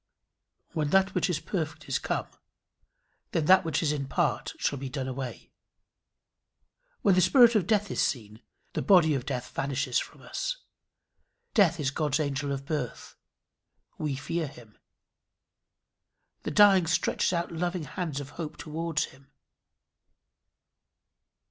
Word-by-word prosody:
"When 150 -2 0
that 195 +3 +3
which - - +1
is 165 -4 0
perfect 155 -5 -4
is 135 - 0
come, - - -2 1.1
then 160 - +1
that 190 +3 +6
which 160 -1 -1
is 150 - +2
in 140 -2 -2
part - - 0
shall 140 - -1
be 135 0 -5
done 130 -1 -4
away." 130 -1 -6 1.5
When 200 - +5
the 185 - +4
spirit 240 +2 +7
of 205 -6 +2
death 210 -2 +1
is - - 0
seen, 110 -3 -2 0.3
the - - -1
body 175 -6 +5
of 135 -2 -3
death 125 -2 -3
vanishes 135 -2 0
from - - -9
us. - - -3 1.0
Death 175 -6 +4
is 135 -2 0
God's 150 0 0
angel 140 -1 -1
of 135 0 -4
birth. 145 -5 -4 0.8
We 150 -3 -1
fear 160 +4 -2
him. 115 -5 -15 1.6
The - - -4
dying 195 -4 +6
stretches 170 - +1
out 170 -1 -1
loving 175 +1 -2
hands 160 -3 -4
of 145 0 -8
hope 155 -1 -6
towards 160 0 -2
him. 135 +1 -12
155 Hz, 140 wpm, -28 LUFS, 135-180 Hz, 1.6 s, spirit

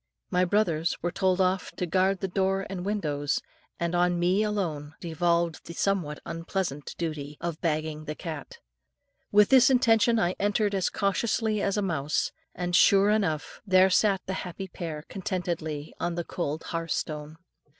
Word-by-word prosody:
My 180 0 +3
brothers 175 -4 +1
were 175 - 0
told 185 0 +1
off 185 0 +1
to 180 - -2
guard 190 +2 +1
the 195 - 0
door 195 +1 0
and 180 -2 -4
windows, 150 -8 -1 0.4
and 170 0 -1
on 175 0 +2
me 180 +4 +2
alone 165 -8 -2
devolved 170 0 0
the 170 - -7
somewhat 175 -7 0
unpleasant 165 -3 -3
duty, 150 -3 -4
of 170 -2 -4
bagging 155 -2 -1
the 150 - -4
cat. 170 - -7 0.7
With 210 0 +6
this 260 -1 +7
intention 230 -2 +4
I 180 -4 +2
entered 205 +1 +1
as 190 -2 +1
cautiously 215 +1 0
as 200 +1 0
a 205 - +1
mouse, 155 -5 0 0.2
and 175 0 -1
sure 200 +2 +6
enough 165 -9 -1
there 190 -1 +5
sat 195 -1 +3
the 190 - -3
happy 190 +2 -6
pair, 160 -4 -6
contentedly, 170 -6 -3
on 175 -1 -1
the 170 - -2
cold 160 -3 -3
hearthstone. 155 -2 -3
180 Hz, 160 wpm, -27 LUFS, 160-195 Hz, 0.7 s, this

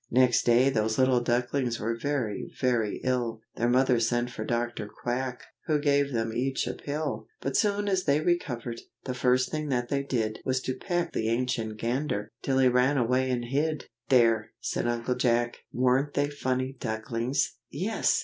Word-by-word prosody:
Next 125 -1 +3
day 125 +3 +5
those 110 -2 0
little 130 -1 +4
ducklings 120 0 0
were 115 +2 -1
very, 120 -4 -2
very 120 -5 +1
ill, 120 -3 -1
Their 120 +1 +2
mother 125 -1 +4
sent 120 +1 0
for - - -5
Dr. 120 -3 -2
Quack, 125 +3 -3 0.2
who 155 -2 +3
gave 140 -1 +2
them 115 -2 -1
each 130 +3 0
a - - -2
pill, 145 -7 -4
But 135 - -3
soon 205 0 +2
as 190 -2 +1
they 145 0 +3
recovered, 125 -9 -1 0.2
the 130 - -3
first 125 0 +2
thing 155 -1 -2
that 120 -2 0
they 140 -1 +1
did 115 -6 -2
Was 130 -1 +1
to 130 - -2
peck 175 +5 -2
the 110 - 0
Ancient 115 -2 -1
Gander, 120 -1 -2
till 135 -1 0
he 130 -1 +5
ran 125 +3 +3
away 130 +1 +2
and 120 -1 -1
hid. 150 +4 -1 0.2
"There!" 115 -4 +4
said - - -2
Uncle 120 +1 0
Jack, 120 -1 +1
"weren't 130 +3 +2
they 145 0 +1
funny 130 -1 -2
ducklings?" 115 +3 -1
"Yes!" - - +1
125 Hz, 175 wpm, -28 LUFS, 120-135 Hz, 0.2 s, day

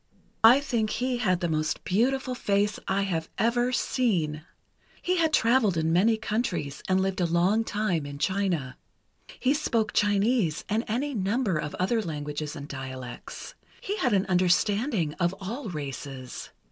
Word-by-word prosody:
"I 240 +5 +9
think 235 -6 0
he 250 +3 -1
had 185 -6 +1
the 175 - +1
most 155 -1 -1
beautiful 255 +6 +1
face 205 -3 0
I 200 +1 +1
have 165 -5 -2
ever 240 +2 +2
seen. 175 - 0 0.6
He 365 +1 0
had 325 -2 +2
traveled 230 - +3
in 160 0 +1
many 220 +6 +4
countries, 185 - -2
and 185 0 +3
lived 190 0 0
a 175 - +2
long 180 +7 +2
time 195 -9 -1
in 140 0 -7
China. 175 -7 -1 0.6
He 260 +2 +3
spoke 230 -8 0
Chinese 205 -4 +2
and 220 +2 0
any 270 +7 -1
number 205 -1 0
of 150 - -4
other 220 +5 +1
languages 150 -3 -4
and 140 - -7
dialects. 130 -3 -7 0.3
He 405 - -3
had 265 - +1
an 195 -2 +2
understanding 185 - +2
of 175 +1 +1
all 220 +5 -5
races. 135 -4 -6
200 Hz, 155 wpm, -27 LUFS, 160-230 Hz, 0.6 s, I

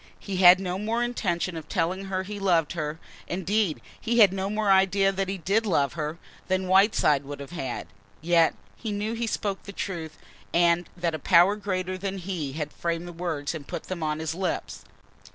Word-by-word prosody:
He 195 -2 -5
had 180 0 +8
no 185 -1 -3
more 225 +3 0
intention 185 -7 -1
of 160 -2 -8
telling 185 +4 -1
her 190 -1 -2
he 205 +2 -6
loved 175 -6 +2
her, 155 -2 -3 0.3
indeed 190 -1 0 0.2
he 235 +1 0
had 205 -5 +7
no 195 0 -2
more 210 -1 +1
idea 195 +1 +4
that 195 0 -2
he 195 - -2
did 195 +6 +1
love 145 - +1
her, 155 +1 -3 0.3
than 185 0 0
Whiteside 185 -7 +4
would 140 0 -7
have 140 -1 -8
had. 135 -8 -4 0.3
Yet 165 0 +3 0.2
he 220 - -5
knew 205 +2 -2
he 230 0 -2
spoke 200 -3 -2
the 200 - -9
truth 170 -6 -5 0.4
and 170 0 +3
that 175 -2 -1
a 155 - -3
power 175 +6 +5
greater 185 -3 -3
than 195 0 -3
he 175 -7 -4
had 150 0 -4
framed 170 0 -3
the 175 - -8
words 165 -4 -3
and 155 -4 -7
put - - -5
them 185 -3 -5
on 155 -1 -1
his 160 0 -3
lips. 185 0 -3
185 Hz, 200 wpm, -26 LUFS, 165-195 Hz, 0.4 s, had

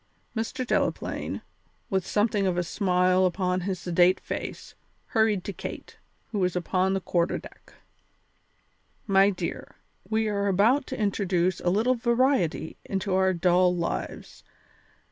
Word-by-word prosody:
Mr. 225 +3 -2
Delaplaine, - - -2 0.5
with 190 -1 0
something 205 -2 +1
of 180 -1 0
a 175 - +1
smile 185 0 +2
upon 180 0 -1
his 190 +1 -2
sedate 180 +1 +3
face, - - -6 0.4
hurried 220 -6 +2
to 200 - -5
Kate, - - -8 0.3
who 210 - -2
was 180 -1 +1
upon 185 +2 +1
the - - +1
quarter 175 -1 0
deck. - - -14 1.3
"My 195 -1 +5
dear, 180 -4 -5 0.3
we 220 0 +1
are 200 -1 0
about 225 +9 +3
to - - -5
introduce 185 -3 0
a 175 - 0
little 220 +7 +2
variety 235 - +1
into 195 0 -2
our 190 0 +3
dull 180 0 +3
lives. 170 -1 -4
190 Hz, 135 wpm, -26 LUFS, 180-210 Hz, 1.3 s, My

